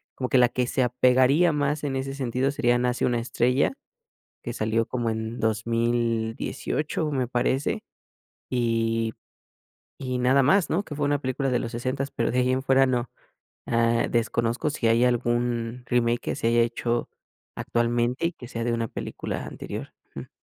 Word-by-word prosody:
como 130 - -2
que 130 - +3
la 125 -1 +5
que 125 -1 -1
se 130 - +1
apegaría 130 +6 +4
más 150 +1 0
en 135 - -2
ese 135 +1 -3
sentido 130 0 -1
sería, 120 -3 +2
Nace 125 0 0
una 120 -1 +1
estrella 125 +3 +1 0.7
que 120 - -3
salió 110 0 0
como 120 -2 -1
en 110 +1 -4
2018 115 +6 -1
me 130 -3 0
parece, 125 +3 0 0.7
y 115 -2 0 0.9
y 130 -1 -2
nada 130 +2 +4
más, 175 +7 +3
¿no? 180 +5 +1
Que 155 - -8
fue 145 0 -1
una 145 0 +2
película 135 0 -1
de 125 - +2
los 115 - -4
sesentas, 130 +4 -2
pero, 115 - -1
de 125 - 0
ahí 125 0 +2
en 130 +1 0
fuera 135 0 +4
no. 125 -1 -1 0.6
Ah, 115 0 +2
desconozco 120 +4 0
si 135 -5 -2
hay 115 +2 +4
algún 120 0 0
remake, 120 0 +1
que - - -3
se - - -2
haya 120 0 +4
hecho 120 0 -1 0.5
actualmente 120 +5 0
y - - -8
que 125 -7 -11
sea 115 -3 -4
de 120 - 0
una 115 -1 -1
película - - -5
anterior. - - -7 0.2
Ujú. - - -7
125 Hz, 170 wpm, -25 LUFS, 115-130 Hz, 0.9 s, la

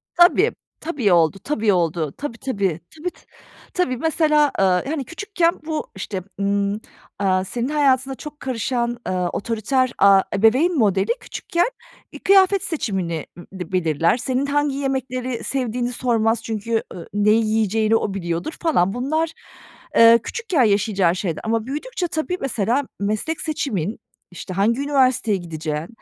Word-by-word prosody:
Tabii, 370 +6 +5 0.3
tabii 275 - 0
oldu, 170 +3 +3
tabii 220 -8 +1
oldu. 165 -4 0
Tabii, 250 -5 -5
tabii, 200 - -1 0.2
tabii, 320 +3 -3
ta - - -23 0.5
tabii. 260 -9 0
Mesela, 300 0 +2
ııı, 185 -2 +3
hani, 285 -4 -2
küçükken 345 - -1
bu 315 -1 -3
işte, 190 -1 -5 0.2
ımm, 200 +1 0 0.4
aaa, 185 -2 +2
senin 240 +6 -3
hayatına 270 -3 +2
çok 295 +2 -10
karışan, 240 -1 -2
ııı, 180 -1 0
otoriter, 235 +4 0
aaa, 195 -1 +6
ebeveyn 255 - +3
modeli 200 -4 +2
küçükken, 345 +6 -1 0.4
ııı, - - -8
kıyafet 390 0 +5
seçimini, 190 - -2
ııı, 175 - -11
dı 180 0 -6
belirler. 165 +1 +2
Senin 260 +2 -1
hangi 290 0 0
yemekleri 260 -3 -2
sevdiğini 245 -2 -2
sormaz 225 -2 +1
çünkü, 225 0 -2
ııı, 170 - -9
neyi 210 +2 +3
yiyeceğini 220 0 +2
o 210 -3 0
biliyordur, 175 - -3
falan. 200 - +2
Bunlar, 310 +6 -1 0.6
eee, 230 0 +8
küçükken 385 - 0
yaşayacağın 200 -4 +2
şeyler 180 -3 -3
ama 225 0 0
büyüdükçe 330 - -3
tabii, 335 +3 -2
mesela, 240 +1 0 0.2
meslek 215 +11 -2
seçimin, 220 - -2 0.3
işte, 180 +1 -7
hangi 220 +7 +1
üniversiteye 260 -7 +2
gideceğin, 155 -2 -4
230 Hz, 140 wpm, -21 LUFS, 195-285 Hz, 0.6 s, eee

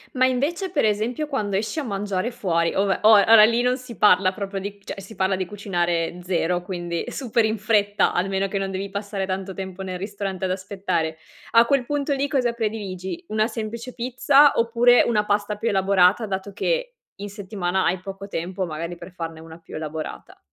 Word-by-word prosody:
Ma 255 - +2
invece 295 +9 0
per 285 -9 +1
esempio, 225 +8 0
quando 210 -9 -1
esci 220 +10 -2
a 300 - -2
mangiare 200 0 -2
fuori, 170 -7 0
ove 195 0 +1
oa 210 -2 +7
ora 225 -1 +9
lì 230 +2 +4
non 250 +1 +2
si 250 -3 -11
parla 185 -2 +5
proprio 195 -1 -5
di 200 +1 -7
cioè, 195 - -7
si 195 +3 -11
parla 190 -2 +1
di 185 0 -2
cucinare 175 -3 -2
zero, 175 -1 0
quindi, 175 -2 -4
super 240 -3 0
in 220 0 0
fretta, 205 -1 +2
almeno 195 +2 0
che 195 - -3
non 195 0 -2
devi 195 +1 -4
passare 200 0 -3
tanto 190 0 -4
tempo 190 0 -7
nel 185 -1 -4
ristorante 195 -1 -4
ad 185 - -1
aspettare. 185 -4 -2 0.3
A 230 0 +6
quel 275 0 +2
punto 290 +1 -1
lì, 280 +1 -1
cosa 250 -4 +1
prediligi? 215 - -4
Una 215 +1 +1
semplice 230 +2 -6
pizza 265 +4 +4
oppure 235 +1 +4
una 210 -3 +1
pasta 205 0 0
più 230 - -3
elaborata, 195 0 +3
dato 195 0 -4
che - - -1 0.2
in 205 +1 -6
settimana 190 -2 -2
hai 180 +1 +1
poco 195 +1 -8
tempo 185 +2 -3
magari 170 +1 -5
per 175 +2 -11
farne 165 -2 -6
una 160 +1 -12
più 165 - -12
elaborata? 155 0 -6
200 Hz, 195 wpm, -23 LUFS, 185-230 Hz, 0.3 s, ora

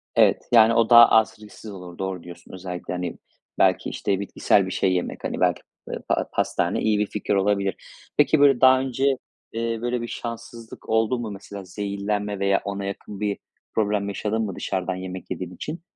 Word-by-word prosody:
Evet, - - +4
yani, 115 -1 +7
o 115 0 +3
daha 120 0 +10
az 110 0 +4
risksiz 105 0 -11
olur, 90 -3 -10
doğru 95 -2 -4
diyorsun 85 +1 -12
özellikle, 90 -1 -6
hani, 90 -1 -4 0.4
belki, - - +3
işte, 100 -2 -1
bitkisel 100 0 +2
bir 95 - -5
şey 95 0 +1
yemek, 90 - -3
hani, - - -3
belki, - - +2 0.3
ııı, - - -5
pa - - 0
pastane - - 0
iyi 105 -1 +2
bir 105 - +2
fikir 105 -1 -2
olabilir. 100 -1 +1 0.4
Peki, 145 +1 +4
böyle, 140 -3 +5
daha 130 0 +7
önce, 130 0 -1 0.5
eee, 115 0 -1
böyle, 120 0 -1
bir 120 - -4
şanssızlık 115 -1 -8
oldu 110 +2 +2
mu 115 -3 -4
mesela, 100 0 -8
zehirlenme 100 +1 -3
veya 100 0 +2
ona 100 0 -3
yakın 100 0 -6
bir 105 -1 -1 0.4
problem 105 -2 +1
yaşadın 105 +3 -2
mı 100 -4 -3
dışarıdan 95 -1 -2
yemek 95 0 -7
yediğin 90 0 -5
için? 160 - -6
105 Hz, 185 wpm, -24 LUFS, 95-115 Hz, 0.5 s, daha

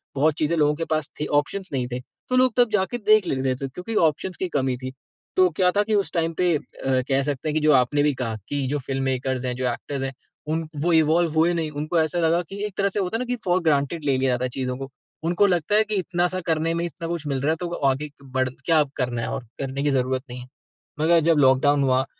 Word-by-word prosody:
बहुत 150 +3 +3
चीज़ें 160 +2 +1
लोगों 150 -1 +3
के 165 +2 -3
पास 155 -2 -2
थीं 150 - -2
ऑप्शंस 195 +5 -7
नहीं 125 -2 -1
थे। 125 - -2 0.3
तो 255 - +2
लोग 255 -2 +4
तब 245 -2 +5
जाके 210 +4 0
देख 215 -3 +4
लेते 130 -2 0
थे, - - -3
क्योंकि 180 - -6
ऑप्शंस 170 +4 -3
की 185 - -1
कमी 130 -2 0
थी। 130 +1 -6 0.4
तो 185 -1 +5
क्या 180 -1 +4
था 205 +2 +2
कि 215 0 0
उस 200 -1 0
टाइम 165 -1 0
पे 175 -3 +3
अ, - - 0 0.5
कह 135 0 +3
सकते 145 +2 -2
हैं - - -1
कि 155 - +2
जो 155 - +4
आपने 135 +3 +3
भी 150 -1 +2
कहा 115 -1 -3
कि 145 -1 -1
जो 145 +2 -1
फ़िल्ममेकर्स 130 -1 -1
हैं, 125 -1 -1
जो 130 0 -1
एक्टर्स 140 +1 -5
हैं, 135 0 -3 0.4
उन 160 +1 0
क 145 - -6
वो 175 - +1
इवॉल्व 160 +1 +3
हुए 160 +2 +3
नहीं। 160 -2 -2
उनको 155 +3 -1
ऐसा 160 +2 0
लगा 165 +1 +2
कि 200 +1 -6
एक 210 - -5
तरह 200 0 +2
से 205 - -2
होता 190 +4 -1
है - - -6
ना 250 - -2
कि 245 0 -1
फ़ॉर 180 0 +3
ग्रांटेड 150 0 +1
ले 140 - +2
लिया 130 0 +1
जाता 125 +1 -1
है 125 - -2
चीज़ों 125 0 -3
को। 135 0 -7 0.4
उनको 175 +4 +3
लगता 180 +1 +1
है 215 - +5
कि 215 0 -3
इतना-सा 180 -1 0
करने 160 0 +1
ही 165 - +1
में 170 - -1
इतना 165 0 -6
कुछ 170 -2 -3
मिल 135 -2 -1
रहा 145 +3 +2
है, 160 - +1
तो 175 - -3
वो 175 - -4
आगे 135 +3 -1
क 145 - -19 0.2
बढ़ 130 -1 +1 0.2
क्या 165 -2 +4
अब 145 -3 +1
करना 120 -2 -1
है - - -3
और? - - -4 0.2
करने 135 0 -3
की 145 - +2
ज़रूरत 130 -1 0
नहीं 125 +1 -7
है। 125 - -10 0.5
मगर 165 +2 +4
जब 165 - +4
लॉकडाउन 140 +1 +4
हुआ, 130 0 +2
155 Hz, 275 wpm, -24 LUFS, 135-175 Hz, 0.5 s, तब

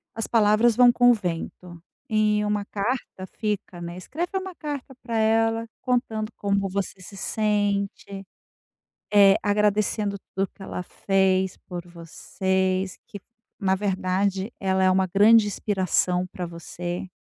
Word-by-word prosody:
as 225 - -3
palavras 220 +1 +4
vão 245 0 +7
com 245 0 +4
o - - +6
vento, 175 -2 -5 0.3
e 210 -1 +2
uma 210 -1 -1
carta 205 -2 -3
fica, 210 -4 -3
né. 170 +1 -6
Escreve 345 - -4
uma 380 -2 -5
carta 285 -3 -6
pra 230 -2 -2
ela, 225 +1 +2 0.2
contando 230 -3 -1
como 200 -1 0
você 195 0 -3
se 195 +3 -11
sente, 200 -2 -1 0.9
eh, 200 -1 +7
agradecendo 210 0 +1 0.2
tudo 195 0 0
que 195 - -14
ela 180 - -5
fez 190 0 +1
por 175 -1 -7
vocês, 185 +2 -2
que 205 -4 -9 0.4
na 190 -1 +2
verdade 190 +1 -1
ela 190 -1 +1
é 185 - +5
uma 190 0 +2
grande 210 +4 +5
inspiração 185 -3 0
pra 180 -1 -5
você, 175 +2 -6
200 Hz, 135 wpm, -24 LUFS, 185-220 Hz, 0.9 s, vão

